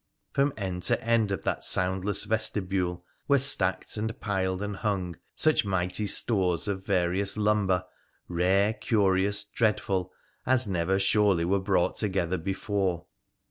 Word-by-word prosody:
From 140 +1 +2
end 95 -3 -4
to - - +2
end 115 -3 +2
of 95 - -3
that - - -2
soundless 95 +2 +1
vestibule 95 -5 -1 0.2
were 140 - +4
stacked 95 -9 +2
and 110 +1 -4
piled 95 -1 -2
and 100 -1 -4
hung 95 -5 -2 0.2
such 155 0 +3
mighty 95 +1 -2
stores 95 -4 +2
of 95 -2 -3
various 95 +1 0
lumber, 105 -3 +1 0.4
rare, 95 +4 +2
curious, 100 -2 +1
dreadful, 100 -3 -1 0.3
as 130 -1 +3
never 95 0 0
surely 100 -3 +3
were 100 +3 +1
brought 95 -2 0
together 95 -4 -1
before. 95 -1 -2
95 Hz, 135 wpm, -27 LUFS, 90-105 Hz, 0.4 s, were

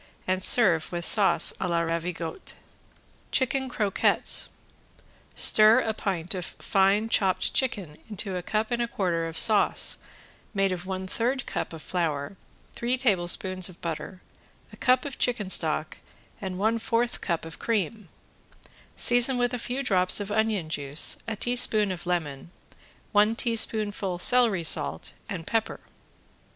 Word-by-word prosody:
and 185 0 -1
serve 180 -10 +3
with 170 -1 -4
sauce 205 -3 +4
a 185 - -2
la 170 -1 0
ravigotte. 170 - -5 0.8
~CHICKEN 265 0 0
CROQUETTES~ 210 -5 0 0.9
Stir 215 +3 +7
a 220 - -2
pint 185 -5 -3
of 185 -2 -5
fine 195 +4 0
chopped 190 -4 +1
chicken 200 - -2
into 200 -2 -3
a 180 - -3
cup 215 +5 -2
and 240 0 -1
a 235 - -1
quarter 175 -8 -2
of 165 0 -8
sauce 215 -3 +3 0.6
made 195 -1 +1
of 180 0 -5
one 190 0 -4
third 245 +6 -2
cup - - -4
of 160 -2 -10
flour, 160 -2 -3 0.4
three 245 +2 -1
tablespoons 185 -5 +1
of 180 - -15
butter, 170 +3 -6 0.5
a - - -12
cup 255 +1 +2
of 280 - -7
chicken 215 -6 -1
stock 155 -2 +1 0.4
and 190 -2 -5
one 220 +4 0
fourth 235 +2 -1
cup 170 -3 -2
of 165 - -10
cream, 215 -3 -2 0.9
season 245 +1 +3
with 245 0 0
a 245 - -3
few 250 +4 -4
drops 185 -6 +3
of 205 0 -5
onion 215 -5 0
juice, 145 -1 0
a 225 - -3
teaspoon 220 -3 +2
of 180 0 -7
lemon, 160 -5 -3 0.6
one 210 +1 +3
teaspoonful 215 -5 0
celery 220 -2 +3
salt 80 - -1 0.2
and 175 -5 -6
pepper. 225 -1 -2
195 Hz, 145 wpm, -26 LUFS, 175-230 Hz, 0.9 s, Stir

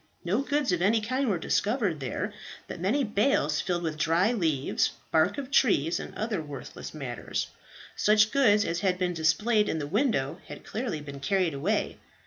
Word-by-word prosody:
No 200 +9 +1
goods 285 -4 0
of 175 -1 0
any 215 +5 +3
kind 255 +4 -1
were 195 - +1
discovered 200 - 0
there, 130 -4 -3 0.3
but - - -7
many 220 +11 +1
bales 205 - +1
filled 175 -1 -2
with 160 -2 -3
dried 175 +9 +2
leaves, 155 -6 +1 0.2
bark 160 +5 +3
of 275 -1 -5
trees, 175 - +3
and - - -8
other 215 -5 -2
worthless 145 -4 -8
matters. 135 -6 -4 0.5
Such 210 0 +4
goods 210 -7 +4
as 170 +1 -1
had 185 -1 +1
been 180 -1 0
displayed 210 +7 +2
in - - -1
the 150 - -3
window 160 - 0
had - - -10
clearly 215 -10 -3
been 140 -1 -8
carried 180 +3 +1
away. 185 +10 -1
185 Hz, 175 wpm, -28 LUFS, 160-220 Hz, 0.5 s, Such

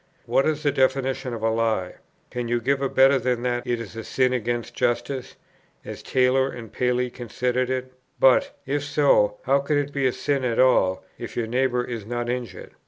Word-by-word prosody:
What 135 - +2
is 155 0 -1
the 145 - +3
definition 130 -1 0
of 115 -2 -6
a 115 - +2
lie? 110 -5 -1 0.3
Can 125 -1 -3
you 120 0 +1
give 135 +3 0
a 135 - 0
better 135 +1 +5
than 125 -1 -1
that 120 0 -2
it 120 -1 0
is 115 -3 -8
a 115 - -5
sin 130 +1 +1
against 120 -1 -2
justice, 120 +2 -2 0.5
as - - -7
Taylor 130 +1 +2
and 115 -4 -9
Paley 125 0 0
consider 125 +1 -2
it? 130 0 -3 0.3
but, 130 -1 +4
if 145 +1 -1
so, 140 -8 +3
how 135 +2 +3
can 145 +1 0
it 145 0 -2
be 140 -2 +1
a - - +2
sin 140 +1 -1
at 120 -2 -1
all, 95 -8 +3
if - - -7
your 120 - 0
neighbour 125 +1 0
is 120 -3 -5
not 120 +2 -3
injured? 120 -7 -5
125 Hz, 200 wpm, -24 LUFS, 120-135 Hz, 0.5 s, better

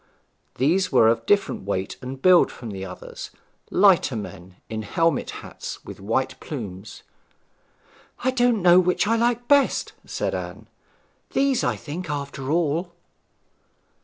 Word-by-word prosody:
These 180 +8 +2
were 125 -4 +6
of 115 0 0
different 205 -1 +2
weight 95 -1 -3
and 130 +1 -6
build 180 +4 +5
from 115 -3 -8
the 95 -1 -6
others; 90 -1 -8 0.4
lighter 185 - +4
men, 95 -3 -8
in 110 -1 -4
helmet 165 +10 0 0.2
hats, - - -8
with - - -9
white 120 +6 -1
plumes. 105 - -7 1.2
'I 260 - +2
don't 245 -4 +2
know 175 0 +7
which 180 +2 +2
I 225 +2 +2
like 240 +1 +1
best,' 285 -1 +3
said - - -3
Anne. - - -6 0.7
'These, 275 -2 +2
I 120 - +1
think, 160 - -7
after 140 -2 -4
all.' 170 +2 0
150 Hz, 135 wpm, -24 LUFS, -, 1.2 s, know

